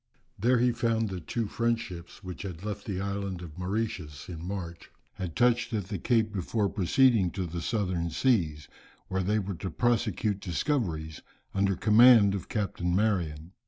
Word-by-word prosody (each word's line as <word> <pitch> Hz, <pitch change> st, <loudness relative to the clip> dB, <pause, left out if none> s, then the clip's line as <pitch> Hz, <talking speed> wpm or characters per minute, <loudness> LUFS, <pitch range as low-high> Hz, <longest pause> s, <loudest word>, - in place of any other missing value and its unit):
There 120 Hz, +5 st, +3 dB
he 125 Hz, +1 st, +3 dB
found 115 Hz, -2 st, 0 dB
that 90 Hz, -4 st, -7 dB
two 115 Hz, -2 st, -1 dB
French 115 Hz, +2 st, 0 dB
ships, 85 Hz, -4 st, -9 dB
which 90 Hz, -1 st, -7 dB
had 95 Hz, -2 st, -7 dB
left 105 Hz, -1 st, -4 dB
the 95 Hz, -3 st, -2 dB
island 100 Hz, -2 st, -3 dB
of 80 Hz, -3 st, -9 dB
Mauritius 90 Hz, -7 st, -3 dB
in 85 Hz, -2 st, -7 dB
March, 90 Hz, -3 st, -6 dB, 0.2 s
had 90 Hz, -4 st, -5 dB
touched 120 Hz, -1 st, +2 dB
at 100 Hz, -3 st, -2 dB
the 100 Hz, -4 st, -3 dB
Cape 110 Hz, +1 st, +1 dB
before 100 Hz, +2 st, 0 dB
proceeding 105 Hz, +1 st, +3 dB
to 95 Hz, -, -2 dB
the 85 Hz, 0 st, -5 dB
southern 90 Hz, -4 st, -1 dB
seas 80 Hz, -, +1 dB, 0.4 s
where 95 Hz, 0 st, 0 dB
they 105 Hz, +4 st, +1 dB
were 100 Hz, -1 st, -2 dB
to 95 Hz, +2 st, -5 dB
prosecute 110 Hz, -1 st, 0 dB
discoveries, 85 Hz, -, -2 dB, 0.3 s
under 100 Hz, 0 st, +2 dB
command 110 Hz, 0 st, +7 dB
of 100 Hz, -, -5 dB
Captain 90 Hz, -4 st, -1 dB
Marion. 90 Hz, -6 st, 0 dB
100 Hz, 165 wpm, -29 LUFS, 90-110 Hz, 0.4 s, command